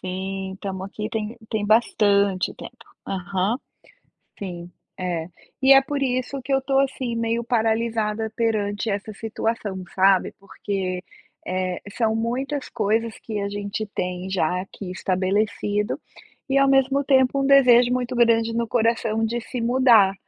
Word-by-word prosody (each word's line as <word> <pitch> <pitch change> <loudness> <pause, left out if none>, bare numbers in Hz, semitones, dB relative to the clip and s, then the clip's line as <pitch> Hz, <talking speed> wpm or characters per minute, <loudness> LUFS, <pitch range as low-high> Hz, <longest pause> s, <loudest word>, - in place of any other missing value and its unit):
Sim, 190 +1 -4
estamos 190 -1 -5
aqui 210 +1 -5
tem 220 +1 -3
tem 215 -2 -1
bastante 200 -3 +2
tempo, - - -12 0.2
aham, 190 +3 -1 0.8
sim, 175 -3 -7 0.3
é, 175 -3 -2 0.3
e 270 +1 +8
é 270 - +8
por 280 +1 -3
isso 255 +1 -1
que 270 +2 -2
eu 270 - +4
estou 270 0 +1
assim 260 -3 -1
meio 230 +1 -1
paralisada 225 -1 0
perante 215 -2 0
essa 205 +1 -3
situação 215 -3 -3
sabe, 190 0 +4
porque, 195 -2 -4 0.4
eh, 185 0 -2
são 220 0 0
muitas 260 +5 -2
coisas 225 0 0
que 215 -2 -5
a 200 0 -2
gente 205 +1 -4
tem 180 +1 -3
já 180 -1 0
aqui 190 -1 -8
estabelecido, 205 +3 -1 0.5
e 270 - +2
ao 275 - +4
mesmo 270 +1 +3
tempo 265 0 +3
um - - +1
desejo 250 -3 +6
muito 250 0 -1
grande 230 -1 +3
no 235 0 -1
coração 225 -1 +1
de 235 +2 -2
se 245 +2 -6
mudar, 235 -5 +5
220 Hz, 145 wpm, -23 LUFS, 195-240 Hz, 0.8 s, e